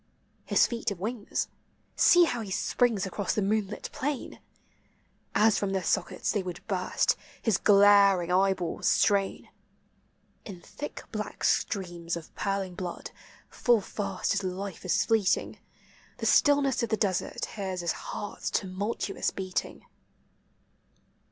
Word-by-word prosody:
His -, -, +4 dB
feet 235 Hz, -2 st, -2 dB
have 200 Hz, -, -5 dB
wings; 215 Hz, +2 st, -3 dB, 0.5 s
see 350 Hz, 0 st, +6 dB
how 245 Hz, -8 st, 0 dB
he 210 Hz, -, -6 dB
springs 220 Hz, +1 st, +1 dB
across 195 Hz, 0 st, -2 dB
the 215 Hz, -, +1 dB
moonlit 210 Hz, 0 st, -2 dB
plain! 285 Hz, -1 st, -4 dB, 1.0 s
As 220 Hz, 0 st, +4 dB
from 195 Hz, -1 st, -1 dB
their 190 Hz, -1 st, -1 dB
sockets -, -, 0 dB
they 205 Hz, -, 0 dB
would 180 Hz, -2 st, -7 dB
burst, 185 Hz, -3 st, +1 dB, 0.2 s
his 220 Hz, -5 st, +1 dB
glar 200 Hz, -2 st, +6 dB
ing 170 Hz, -, -4 dB
eyeballs 190 Hz, -1 st, +1 dB
strain; 200 Hz, -1 st, +2 dB, 0.9 s
In 190 Hz, -4 st, -9 dB
thick 295 Hz, +11 st, -8 dB
black 210 Hz, -2 st, -5 dB
streams 175 Hz, -4 st, -1 dB
of 165 Hz, -, -11 dB
purling 195 Hz, -2 st, -2 dB
blood, 175 Hz, -1 st, -6 dB, 0.4 s
full 240 Hz, -2 st, +2 dB
fast 195 Hz, -1 st, -3 dB
his 200 Hz, 0 st, 0 dB
life 190 Hz, 0 st, -5 dB
is 180 Hz, -, +2 dB
fleeting; 220 Hz, -5 st, +1 dB, 0.6 s
The -, -, -4 dB
stillness 280 Hz, -3 st, +4 dB
of 235 Hz, -, -1 dB
the 220 Hz, -, +1 dB
desert 195 Hz, -5 st, -1 dB
hears 190 Hz, -3 st, -4 dB
his 170 Hz, -1 st, 0 dB
heart's 205 Hz, -, -5 dB
tu -, -, -1 dB
multuous 195 Hz, +2 st, -2 dB
beating. 185 Hz, -1 st, -4 dB
200 Hz, 135 wpm, -28 LUFS, 185-220 Hz, 1.0 s, see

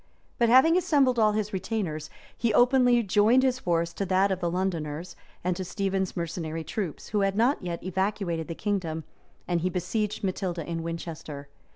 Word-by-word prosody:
But 235 Hz, -1 st, +4 dB
having 265 Hz, +7 st, +6 dB
assembled 285 Hz, -9 st, +3 dB
all 215 Hz, -1 st, +4 dB
his 210 Hz, -1 st, -2 dB
retainers, 185 Hz, -6 st, -3 dB, 0.3 s
he 225 Hz, -3 st, 0 dB
openly 245 Hz, -1 st, +5 dB
joined 215 Hz, +6 st, +4 dB
his 255 Hz, -1 st, +1 dB
force 170 Hz, -4 st, 0 dB
to 200 Hz, -, -2 dB
that 190 Hz, +2 st, +3 dB
of 190 Hz, -, -1 dB
the 175 Hz, -2 st, 0 dB
Londoners, 170 Hz, -3 st, -3 dB, 0.3 s
and 180 Hz, 0 st, 0 dB
to 185 Hz, -, -4 dB
Stephen's 190 Hz, 0 st, -2 dB
mercenary 165 Hz, -1 st, -3 dB
troops, 170 Hz, 0 st, -4 dB
who 210 Hz, -, 0 dB
had 195 Hz, 0 st, +1 dB
not 240 Hz, +7 st, +2 dB
yet 175 Hz, -2 st, -5 dB
evacuated 185 Hz, -3 st, -1 dB
the 165 Hz, -, -5 dB
kingdom; 170 Hz, -6 st, -2 dB, 0.4 s
and 175 Hz, -2 st, 0 dB
he 180 Hz, -, +1 dB
besieged 195 Hz, +4 st, -2 dB
Matilda 180 Hz, -3 st, -2 dB
in 165 Hz, -1 st, -3 dB
Winchester. 160 Hz, -4 st, -6 dB
190 Hz, 175 wpm, -27 LUFS, 170-215 Hz, 0.4 s, having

